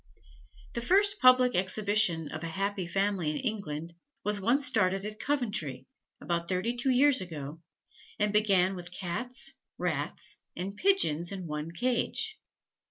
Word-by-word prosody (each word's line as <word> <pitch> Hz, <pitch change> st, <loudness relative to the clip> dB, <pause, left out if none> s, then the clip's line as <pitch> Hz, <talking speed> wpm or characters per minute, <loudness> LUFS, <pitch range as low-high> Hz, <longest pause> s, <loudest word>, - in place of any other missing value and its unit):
The 235 Hz, -, -3 dB
first 400 Hz, -, +3 dB
public 255 Hz, -1 st, +6 dB
exhibition 190 Hz, -3 st, +2 dB
of 155 Hz, +1 st, -6 dB
a -, -, -3 dB
"happy 195 Hz, +2 st, -2 dB
family" 195 Hz, -2 st, 0 dB
in 150 Hz, -, -2 dB
England, 170 Hz, -, -4 dB, 0.3 s
was 210 Hz, -1 st, -1 dB
one 235 Hz, +7 st, +3 dB
started 195 Hz, -8 st, +2 dB
at 215 Hz, 0 st, -6 dB
Coventry, 205 Hz, -, -2 dB, 0.3 s
about 170 Hz, -1 st, -2 dB
thirty 190 Hz, +6 st, 0 dB
two 255 Hz, +3 st, 0 dB
years 260 Hz, -1 st, +4 dB
ago, 160 Hz, -3 st, -7 dB, 0.6 s
and 210 Hz, 0 st, +1 dB
began 195 Hz, -3 st, +3 dB
with 175 Hz, -1 st, -8 dB
Cats, 200 Hz, +8 st, -3 dB, 0.3 s
Rats, -, -, -2 dB, 0.2 s
and 195 Hz, +3 st, -4 dB
Pigeons 205 Hz, -, +2 dB
in 190 Hz, -2 st, -6 dB
one 150 Hz, 0 st, -4 dB
cage. 250 Hz, -, -1 dB
200 Hz, 140 wpm, -29 LUFS, 170-245 Hz, 0.6 s, public